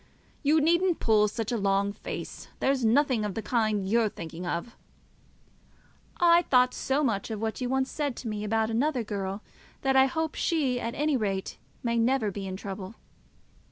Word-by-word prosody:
You 300 +2 +4
needn't 340 +3 +2
pull 215 -2 +4
such 225 +1 -3
a 240 - 0
long 200 0 +1
face. - - -7
There's 270 -2 +1
nothing 245 0 +3
of 205 -2 -3
the 225 - -3
kind 215 -5 0
you're 225 +1 +2
thinking 170 0 -7
of." 175 +7 -3 1.4
"I 345 0 +6
thought 250 -6 +3
so 275 +3 0
much 220 -6 -1
of 220 -2 -4
what 220 +3 -3
you 250 - -1
once 265 0 0
said 290 -5 -2
to 240 - -7
me 210 -1 -3
about 220 +1 0
another 255 +2 +1
girl 200 -1 -4 0.4
that 270 -1 +1
I 265 0 +6
hope 320 +3 -2
she 275 -7 0
at 235 -1 -4
any 300 0 +1
rate 195 -5 -2 0.2
may 235 -1 +1
never 230 -2 +2
be 195 0 -5
in 190 0 -5
trouble." 195 +1 -7
230 Hz, 180 wpm, -28 LUFS, 205-270 Hz, 1.4 s, I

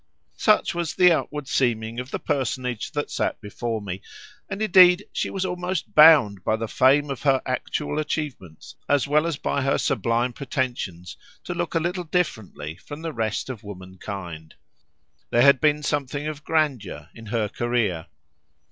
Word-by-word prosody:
Such 215 -1 +3
was 170 -2 -3
the 180 -1 +6
outward 150 -3 -2
seeming 115 -3 0
of 125 +1 -6
the - - -3
personage 130 -5 -2
that 145 -1 -3
sat - - -1
before 110 +1 -4
me, 95 -1 -5 0.5
and 195 - -4
indeed 185 -2 +6
she - - -1
was 190 -1 -2
almost 180 -1 -3
bound 145 - +7
by 110 - +1
the 115 0 -4
fame 140 +5 +3
of 135 - -5
her 135 -2 +3
actual 145 +3 -2
achievements, 145 - -5 0.2
as 145 -1 +2
well 150 +3 +2
as 165 -4 -2
by 140 - -1
her 135 +1 +1
sublime 120 +1 0
pretensions, 120 - -4 0.3
to 175 - -4
look 175 0 -3
a - - +4
little 180 +2 -2
differently 110 - -3
from 145 +9 -10
the 165 -1 -4
rest 110 -3 -2
of 120 -4 -7
womankind. 95 -4 -8 0.7
There 120 - +4
had 140 -1 +6
been 150 -1 +2
something 145 0 -2
of 155 -1 -5
grandeur 135 - -1
in 115 -1 -12
her 110 -1 0
career. 110 -7 -1
130 Hz, 165 wpm, -24 LUFS, 110-155 Hz, 0.7 s, bound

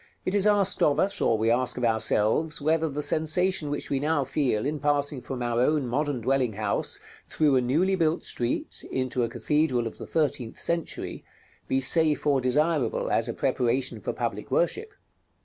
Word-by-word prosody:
It 185 - 0
is 205 0 +3
asked 200 -2 +2
of 145 - +3
us, 200 0 0
or 115 - +3
we 110 +1 +1
ask 125 +1 0
of 125 - 0
ourselves, 115 +6 +1
whether 160 +2 +1
the 150 +1 -4
sensation 160 +2 +1
which 145 - -4
we 140 - +1
now 150 0 +1
feel 130 -5 0
in 150 +1 -2
passing 145 -1 0
from 125 0 -5
our 120 -1 0
own 150 +1 +2
modern 140 +1 -1
dwelling 130 -1 +1
house, 100 0 -2 0.3
through 150 -3 +2
a 130 - +4
newly 160 +10 +1
built 165 -3 0
street, 120 0 -3
into 130 -1 -1
a 115 - -1
cathedral 125 0 0
of 115 - -7
the - - -7
thirteenth 140 -7 -1
century, 170 -1 -3 0.4
be 130 - +1
safe 155 +3 +2
or 140 -3 +3
desirable 145 0 +1
as 115 +1 +2
a - - -2
preparation 130 -1 0
for - - -2
public - - -4
worship. 440 -4 0
145 Hz, 185 wpm, -26 LUFS, 125-160 Hz, 0.4 s, a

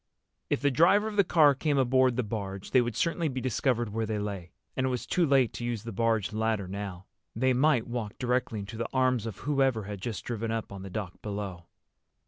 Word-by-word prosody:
If - - 0
the 145 0 +3
driver 175 - +4
of 215 - -5
the 200 - +5
car 155 -5 +5
came 145 +1 0
aboard 130 -1 +3
the 125 - 0
barge, 100 -3 -5
they 130 - +6
would 120 -2 -2
certainly 170 -1 0
be 130 -3 -3
discovered 125 -2 0
where 110 +1 -2
they 110 0 -1
lay. 100 -4 -4 0.2
And 130 0 +1
it - - +1
was 125 -2 -2
too 175 -2 +2
late 135 -4 +3
to - - -6
use 120 -3 -2
the 115 - -6
barge 115 -3 0
ladder 110 -3 0
now. 95 -1 -6 0.3
They 130 +3 +2
might 130 -2 +3
walk 120 -4 -4
directly 125 -2 0
into 100 +3 -8
the 115 0 -3
arms 130 -3 +2
of 110 - -6
whoever 135 -6 +1
had 100 -1 -7
just 110 -1 -4
driven 115 -1 -3
up 115 -2 -3
on 100 -1 -7
the 95 - -7
dock 95 -2 -6
below. 100 -5 -5
115 Hz, 225 wpm, -29 LUFS, 105-130 Hz, 0.3 s, they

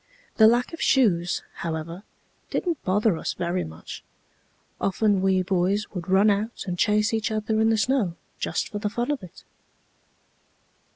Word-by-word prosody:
The 220 - +8
lack 240 +6 +2
of 330 - -7
shoes, 180 -10 +2
however, 165 +2 -4 0.5
didn't 340 -5 -2
bother 200 -1 +2
us - - -2
very 175 +1 -1
much. 80 0 -9 0.8
Often 200 0 +1
we 190 -1 +2
boys 190 +3 +1
would 180 -2 -6
run 195 +3 +5
out 210 +3 -2
and 180 -3 -3
chase 210 +2 +2
each 220 -1 0
other 220 0 0
in 220 - +4
the 225 - +3
snow 220 -7 +1 0.2
just - - -2
for 210 - -4
the 210 0 -1
fun 240 +6 -2
of 285 -5 -2
it. 180 -3 -13
205 Hz, 160 wpm, -25 LUFS, 185-225 Hz, 0.8 s, The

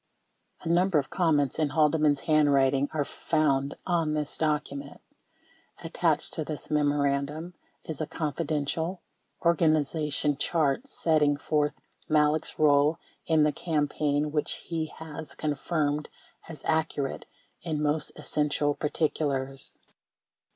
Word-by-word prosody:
A - - -7
number 175 +1 +3
of 140 - -1
comments 155 -6 +1
in 155 -2 +2
Haldeman's 150 -1 +3
handwriting 140 -3 +3
are 150 -2 -1
found 140 -4 0
on 165 -4 +1
this 150 -1 -3
document. 145 -2 -2 0.8
Attached - - 0
to 155 - -2
this 150 -2 -6
memorandum 145 +2 0 0.3
is 160 -1 -5
a 155 - -2
"Confi 155 0 -3
dential" 160 +4 -1 0.5
organization 155 -3 +2
chart 160 - +1
setting 155 - +2
forth 150 0 0 0.4
Malek's 150 0 +2
role 150 +1 +4 0.3
in 160 -2 +4
the 150 - +3
campaign 150 -2 0
which 150 -1 -1
he 165 -2 -2
has 160 0 -9
confirmed 150 0 -1 0.4
as 155 -4 -9
accurate 160 -3 -1 0.3
in 155 -3 -2
most 150 0 0
essential 150 -1 0
particulars. 140 -3 -2
150 Hz, 115 wpm, -28 LUFS, 145-160 Hz, 0.8 s, role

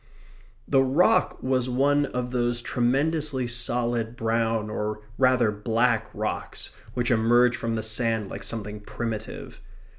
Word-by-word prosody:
The 135 -1 +4
rock 135 +7 +3
was 130 -1 +1
one 140 +3 +2
of 125 -1 -3
those 120 -1 0
tremendously 135 +3 0
solid 120 -1 -1
brown, 115 -2 0
or 105 0 -3 0.2
rather 130 -4 +4
black, 110 +2 +1
rocks - - -4 0.2
which 120 0 +1
emerge 120 +2 +4
from 115 -1 -2
the 110 - -2
sand 110 -1 0
like - - -7
something 105 -2 -5
primitive. 110 +1 -6
120 Hz, 125 wpm, -26 LUFS, 110-125 Hz, 0.2 s, The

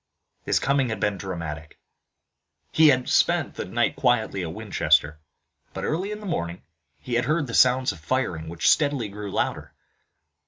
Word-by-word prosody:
His - - +1
coming 135 -2 +1
had 110 -2 -3
been 100 -1 -1
dramatic. 80 -5 -6 0.9
He 160 0 +5
had 130 -3 +3
spent - - +2
the - - -5
night - - 0
quietly 110 -5 +1
at 85 -2 -4
Winchester, 80 -7 +1 0.6
but, - - -4
early 185 +6 -2
in 210 0 -6
the - - -9
morning, 85 - -3 0.3
he 80 - -7
had 120 +1 +1
heard 155 +2 +1
the 115 - -8
sounds 130 +1 +4
of 80 - -11
firing 80 -4 -2
which 85 -2 -2
steadily 140 -7 +2
grew 105 0 -7
louder. - - -3
110 Hz, 165 wpm, -24 LUFS, 85-130 Hz, 0.9 s, He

